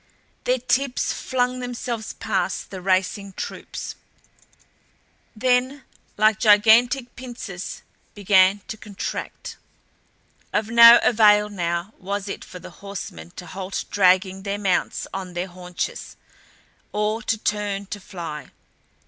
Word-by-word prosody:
Their 250 Hz, +1 st, +2 dB
tips 255 Hz, +1 st, 0 dB
flung 255 Hz, 0 st, -1 dB
themselves 240 Hz, -2 st, -4 dB
past 190 Hz, -4 st, -2 dB
the 190 Hz, -2 st, -7 dB
racing 190 Hz, +1 st, 0 dB
troops; -, -, -6 dB, 1.4 s
then 255 Hz, +4 st, +1 dB, 0.3 s
like 215 Hz, 0 st, +4 dB
gigantic 235 Hz, +4 st, +5 dB
pincers 235 Hz, -8 st, -7 dB, 0.3 s
began 195 Hz, 0 st, +4 dB
to 220 Hz, -, -6 dB
contract. 205 Hz, -2 st, -6 dB, 0.9 s
Of 220 Hz, +1 st, -1 dB
no 235 Hz, 0 st, +10 dB
avail 210 Hz, -2 st, +5 dB
now 175 Hz, 0 st, -3 dB
was 200 Hz, +2 st, -4 dB
it 195 Hz, -, -5 dB
for 180 Hz, -, -10 dB
the -, -, -11 dB
horsemen 185 Hz, -, -7 dB
to 180 Hz, -, -8 dB
halt 190 Hz, +2 st, -5 dB
dragging 190 Hz, 0 st, +3 dB
their 200 Hz, +1 st, -3 dB
mounts 195 Hz, -3 st, 0 dB
on 185 Hz, -2 st, -6 dB
their 175 Hz, +1 st, -1 dB
haunches, 180 Hz, -1 st, -6 dB, 0.8 s
or 210 Hz, +2 st, -1 dB
to 225 Hz, 0 st, 0 dB
turn 205 Hz, -2 st, -2 dB
to 205 Hz, +1 st, -6 dB
fly. 165 Hz, -7 st, -7 dB
205 Hz, 115 wpm, -23 LUFS, 185-230 Hz, 1.4 s, no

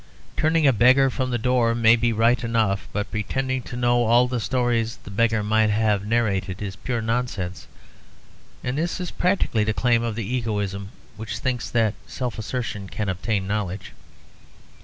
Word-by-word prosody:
Turning 160 Hz, 0 st, +2 dB
a 135 Hz, -, +6 dB
beggar 130 Hz, +4 st, +5 dB
from 130 Hz, 0 st, -2 dB
the 120 Hz, -, 0 dB
door 120 Hz, -1 st, +2 dB
may 115 Hz, 0 st, +5 dB
be 120 Hz, 0 st, +1 dB
right 115 Hz, +2 st, +2 dB
enough, 110 Hz, -4 st, 0 dB
but 105 Hz, 0 st, -3 dB
pretending 130 Hz, +5 st, -2 dB
to 120 Hz, -, -8 dB
know 120 Hz, 0 st, +2 dB
all 120 Hz, +2 st, +4 dB
the 125 Hz, -1 st, -2 dB
stories 120 Hz, -1 st, 0 dB
the -, -, -10 dB
beggar 110 Hz, +1 st, +1 dB
might 110 Hz, +1 st, +2 dB
have 105 Hz, -1 st, +1 dB
narrated 100 Hz, -5 st, 0 dB
is 100 Hz, -2 st, -5 dB
pure 120 Hz, -3 st, -3 dB
nonsense; 110 Hz, -6 st, -3 dB, 1.0 s
and 125 Hz, +4 st, -2 dB
this 170 Hz, +3 st, -2 dB
is 180 Hz, -2 st, -4 dB
practically 180 Hz, -, +1 dB
the 110 Hz, 0 st, -1 dB
claim 120 Hz, -2 st, +2 dB
of 115 Hz, -2 st, -2 dB
the 115 Hz, -2 st, -3 dB
egoism 105 Hz, -4 st, -2 dB, 0.3 s
which 110 Hz, 0 st, -5 dB
thinks 125 Hz, -3 st, -2 dB
that 110 Hz, -3 st, +2 dB
self 125 Hz, -5 st, -4 dB
assertion 110 Hz, -4 st, -4 dB
can 105 Hz, -2 st, -3 dB
obtain 95 Hz, +1 st, -1 dB
knowledge. 100 Hz, -1 st, -3 dB
115 Hz, 170 wpm, -23 LUFS, 105-125 Hz, 1.0 s, a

